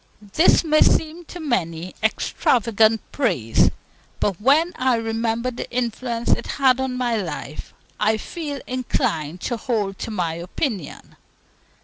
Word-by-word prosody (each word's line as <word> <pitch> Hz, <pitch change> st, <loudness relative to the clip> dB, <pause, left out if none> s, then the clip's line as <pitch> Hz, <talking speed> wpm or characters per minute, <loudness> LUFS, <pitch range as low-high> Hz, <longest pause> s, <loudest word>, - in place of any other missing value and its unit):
This 330 Hz, -, +5 dB
may 310 Hz, -1 st, +3 dB
seem 325 Hz, +2 st, +2 dB
to 350 Hz, -, -9 dB
many 180 Hz, -, -2 dB
extravagant 220 Hz, 0 st, +2 dB
praise; 130 Hz, -, +2 dB, 0.5 s
but 200 Hz, -2 st, -1 dB
when 310 Hz, +8 st, +4 dB
I 255 Hz, -1 st, +2 dB
remember 225 Hz, +2 st, -1 dB
the 245 Hz, -, -6 dB
influence 235 Hz, -1 st, -2 dB
it -, -, +1 dB
had 265 Hz, -2 st, +4 dB
on 260 Hz, -1 st, -2 dB
my 245 Hz, -2 st, 0 dB
life, 165 Hz, -6 st, -5 dB, 0.3 s
I 215 Hz, +1 st, +2 dB
feel 290 Hz, +2 st, -5 dB
inclined 175 Hz, -, -2 dB
to 240 Hz, -, -2 dB
hold 210 Hz, -6 st, -2 dB
to -, -, -4 dB
my 175 Hz, -7 st, -1 dB
opinion. 180 Hz, -, -4 dB
230 Hz, 130 wpm, -22 LUFS, 200-260 Hz, 0.5 s, This